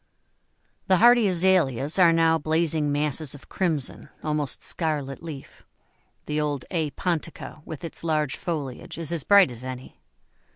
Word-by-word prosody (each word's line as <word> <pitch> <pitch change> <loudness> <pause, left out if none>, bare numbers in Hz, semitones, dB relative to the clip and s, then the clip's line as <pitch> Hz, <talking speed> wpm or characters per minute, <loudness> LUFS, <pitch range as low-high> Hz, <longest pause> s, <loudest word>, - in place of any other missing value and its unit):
The 185 - +4
hardy 240 +1 +6
Azaleas 170 -6 +2
are 175 -2 +7
now 165 0 +3
blazing 155 -1 0
masses 150 0 -1
of 140 - -15
crimson, 160 -8 -2
almost 150 -3 -1
scarlet 150 -5 -3
leaf; 155 -5 -9 0.6
the 150 0 -1
old 145 -3 -2
A. 160 -4 0
pontica, 165 -1 -4
with 155 - -8
its 165 - -5
large 155 -4 0
foliage, 145 -8 -5
is 165 -1 -3
as 165 -5 -1
bright 200 -8 +6
as 120 0 -8
any. 130 0 -8
155 Hz, 140 wpm, -25 LUFS, 145-170 Hz, 0.6 s, are